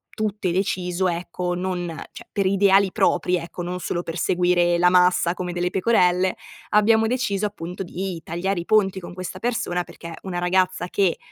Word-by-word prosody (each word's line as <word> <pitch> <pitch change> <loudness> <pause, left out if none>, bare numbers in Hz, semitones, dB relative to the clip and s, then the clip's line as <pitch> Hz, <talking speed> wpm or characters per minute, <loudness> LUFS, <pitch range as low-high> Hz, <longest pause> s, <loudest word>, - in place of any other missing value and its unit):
tutte 210 -3 -1
deciso, 185 0 0
ecco, 175 +1 -3
non 180 -1 -3 0.2
cioè - - -12
per 200 - 0
ideali 195 0 +4
propri, 180 0 +2
ecco, 175 +1 -6
non 180 +1 -4
solo 175 0 -3
per 165 - -6
seguire 175 0 +2
la 180 +1 +4
massa 180 -1 +4
come 180 -1 -4
delle 175 0 -1
pecorelle, 185 -3 +2 0.3
abbiamo 220 +1 +4
deciso 215 -5 0
appunto 180 -3 -7
di 185 -1 -4
tagliare 175 +4 -2
i 170 - -5
ponti 195 -3 +2
con 175 -1 -10
questa 185 0 -6
persona, 190 -6 -1
perché 170 -1 -10
una 185 -2 -5
ragazza 180 0 +1
che, 185 -1 +1
180 Hz, 170 wpm, -23 LUFS, 175-195 Hz, 0.3 s, ideali